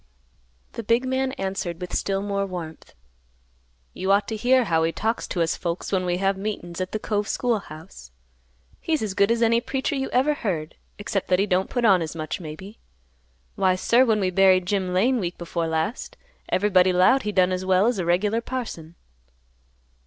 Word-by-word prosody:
The - - -6
big 230 +3 +1
man 260 0 0
answered 190 -5 -4
with 180 -1 -7
still 195 0 -1
more 200 -1 -1
warmth, 170 -4 -8 1.0
"You 190 +1 -1
ought 200 +1 +3
to 220 - -3
hear 250 +4 +3
how 165 -6 +1
he 165 +1 +1
talks 220 +6 -2
to 175 - 0
us 165 - -1
folks 170 0 -4
when 185 -2 0
we 175 0 0
have 195 +1 0
meetin's 190 -4 -5
at 185 - -3
the - - -1
Cove 210 -1 -2
school 240 -3 0
house. 150 - -12 0.7
He's 315 -6 -1
as 205 -3 -3
good 200 +1 +3
as 230 0 +2
any 230 +1 +3
preacher 270 +4 -2
you 270 -1 -2
ever 270 +4 +2
heard; 170 - -3 0.2
except 205 -1 -3
that 180 - +3
he 195 - +2
don't 185 -1 0
put 245 -2 -1
on 190 -5 +5
as 160 0 -4
much, 155 +2 -4
maybe. 185 +6 -9 0.7
Why, 185 -1 +2
sir, 235 +7 +3
when 220 -4 +2
we 185 -2 0
buried 185 -1 +4
Jim 190 -1 -1
Lane 235 +8 +2
week 175 -3 -4
before 170 -1 -3
last, 160 +9 -3 0.3
everybody 185 -2 +3
'lowed 185 +9 +4
he 210 - -3
done 185 -2 +3
as 185 0 -2
well 185 +1 +3
as 235 -3 +1
a - - 0
regular 205 +6 +1
parson." 225 -11 -6
195 Hz, 195 wpm, -24 LUFS, 180-225 Hz, 1.0 s, on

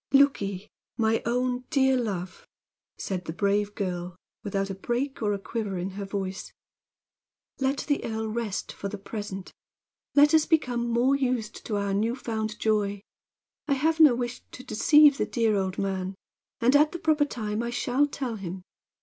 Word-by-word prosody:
"Look 280 -2 +5
ye, 195 0 -4 0.3
my 225 0 +2
own 250 +1 0
dear 265 -3 +3
love," 190 -7 -3 0.5
said 185 -3 -4
the 160 - -3
brave 205 +2 0
girl, 180 -3 -3 0.3
without 195 -1 -2
a - - -3
break 240 +8 -3
or 210 -2 +1
a 200 - 0
quiver 200 -1 -4
in 180 +2 -3
her 200 +1 -5
voice, 195 -1 -4 1.1
"let 270 +1 0
the 290 -1 +1
earl 220 -1 -3
rest 215 -2 -3
for 200 - -5
the 210 - -5
present. 195 -2 -7 0.6
Let 295 +2 +6
us 315 -1 +5
become 245 -7 +1
more 245 +4 +3
used 250 -5 -2
to 215 - -1
our 200 -1 -1
new 220 +4 +1
found 220 -4 -3
joy. 205 -2 0 0.7
I 285 - +3
have 315 +4 +1
no 300 -6 +8
wish 245 0 -4
to 255 - -9
deceive 295 +5 +5
the - - +1
dear 225 -3 +1
old 190 -1 -1
man, 190 -1 -2 0.4
and 250 +4 +4
at 300 +3 +4
a - - -1
proper 310 -3 +2
time 215 -5 -3
I 235 - -2
shall 250 +3 +1
tell 260 -5 -4
him. 185 -1 -6
220 Hz, 175 wpm, -27 LUFS, 200-260 Hz, 1.1 s, no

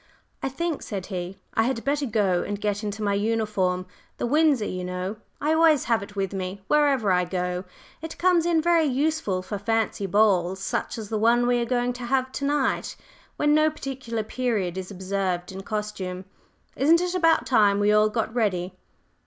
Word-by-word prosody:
"I 270 - -1
think," 330 +3 -3
said 195 -4 -5
he, 180 -1 -5 0.2
"I - - +2
had 250 -2 -1
better 285 0 0
go 200 -6 +1
and 205 0 -4
get 205 0 -2
into 210 0 -4
my 200 -1 +1
uniform 205 -4 0 0.3
the - - -2
Windsor, 290 -3 +3
you 185 -2 -4
know! 180 +3 -4 0.2
I 300 +2 +1
always 320 -3 +4
have 230 -3 +1
it 205 +1 -10
with 195 -1 -2
me 190 +1 -5
wherever 280 -8 +3
I 180 0 +3
go; 180 0 -3 0.4
it 320 0 -7
comes 350 -2 +3
in 330 -2 +2
very 340 -1 +4
useful 275 -9 0
for 200 +2 -5
fancy 220 -1 -1
balls 190 -2 +3
such 195 - -3
as 215 -2 -6
the 220 - -1
one 235 +2 +4
we 245 0 +2
are - - 0
going 245 0 0
to 245 0 -7
have 260 +1 0
to 280 - -3
night, 285 -1 0 0.4
when 295 0 +3
no 310 +1 +4
particular 265 -6 -5
period 220 -6 -1
is 190 -1 -5
observed 190 -2 -2
in 190 0 -7
costume. 195 -3 -4 0.5
Isn't 320 +5 +4
it 360 0 -1
about 330 -3 +3
time 205 -5 +4
we 205 0 +3
all 210 0 +4
got 225 0 -2
ready?" 190 -6 0
220 Hz, 190 wpm, -25 LUFS, 195-270 Hz, 0.5 s, always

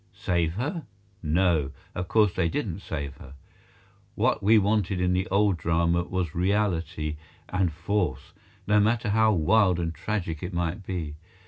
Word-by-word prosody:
Save 85 -2 0
her? 145 - -3 0.3
No, 80 -3 +1 0.2
of 90 0 -4
course 105 -3 +3
they 85 - +1
didn't 100 - -3
save 70 -7 -5
her. 70 - -12 0.8
What - - +1
we 110 +3 +5
wanted 100 -2 +1
in 90 0 +2
the 95 +1 0
Old 100 -1 +2
Drama 85 +1 +1
was 90 -4 -2
reality 85 -5 0 0.3
and 90 -2 +1
force, 85 -5 -2 0.3
no 105 +1 +4
matter 110 0 +1
how 110 +1 +4
wild 90 +1 +3
and 85 -1 -2
tragic 85 -6 -3
it 90 +1 -5
might 85 +3 -2
be. 85 -5 -4
90 Hz, 150 wpm, -26 LUFS, 80-105 Hz, 0.8 s, we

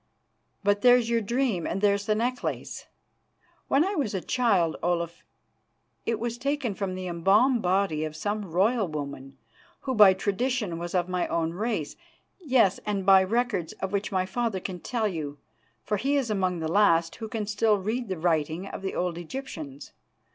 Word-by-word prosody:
But 205 0 +2
there's 245 -2 +5
your 230 -1 +2
dream 230 -5 0
and - - -2
there's 200 0 +2
the 215 - +2
necklace. 245 +3 -3 0.8
When 285 +5 +3
I 395 - -1
was 275 - -1
a - - 0
child, 195 -8 +1
Olaf, 170 0 -2 0.8
it 230 -1 0
was 235 +1 -3
taken 275 -3 -1
from 190 -1 -3
the 185 0 -5
embalmed 200 +9 +3
body 185 -4 +1
of 155 -1 -4
some 205 +7 -2
royal 200 +5 +2
woman, 140 -3 -6 0.4
who, 260 - -2
by 205 -5 +7
tradition, 205 -2 -1
was 175 +1 -5
of 175 -1 +1
my 180 -1 -1
own 165 0 -1
race, 205 -5 -3 0.4
yes, 255 - +3
and 200 -2 -2
by 195 -1 +7
records 210 -4 -1
of 190 - -5
which 200 0 -2
my 185 -1 +1
father 220 0 -2
can 180 -1 -6
tell 225 +3 -1
you, 155 -6 -4 0.5
for 210 - -1
he 275 +7 0
is 250 -5 -1
among 185 -4 0
the 160 - -1
last 170 -2 +3
who 225 - -5
can 215 -1 -3
still 210 +1 +2
read 220 +5 -2
the 185 - -2
writing 160 +1 0
of 195 - -7
the 195 - -4
old 175 -1 -1
Egyptians. 160 - -7
200 Hz, 175 wpm, -27 LUFS, 175-230 Hz, 0.8 s, by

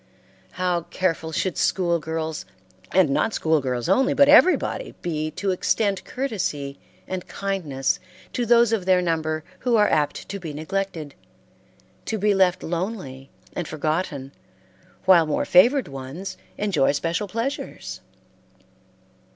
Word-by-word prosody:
How 180 -1 0
careful 165 -3 -1
should 180 +2 -1
school 175 -3 +2
girls, 160 0 -3 0.5
and 180 -6 +4
not 220 +10 +1
school 160 -2 +2
girls 125 -3 -2
only, 265 0 +3
but 280 - +6
everybody 365 +10 +4
be 155 -2 -2
to 200 -1 0
extend 195 +1 0
courtesy 185 - -3 0.3
and 185 -1 -5
kindness 180 -7 -1 0.3
to 245 -2 -1
those 235 -1 +5
of 195 -5 -1
their 185 -1 +5
number 160 -3 -1 0.2
who 245 -1 +1
are 210 -1 +5
apt 150 -1 0
to 200 - -4
be 165 -5 -6
neglected, 160 -1 -3 0.9
to 220 - -2
be 210 0 +2
left 185 -2 +3
lonely 165 - -4 0.2
and 175 - -4
forgotten 155 -3 -2 0.7
while 175 -4 +6
more 150 - 0
favored 245 +10 +5
ones 135 +8 -7 0.2
enjoy 190 -11 +2
special 165 +7 -1
pleasures! 230 +8 -4
180 Hz, 130 wpm, -24 LUFS, 155-200 Hz, 0.9 s, but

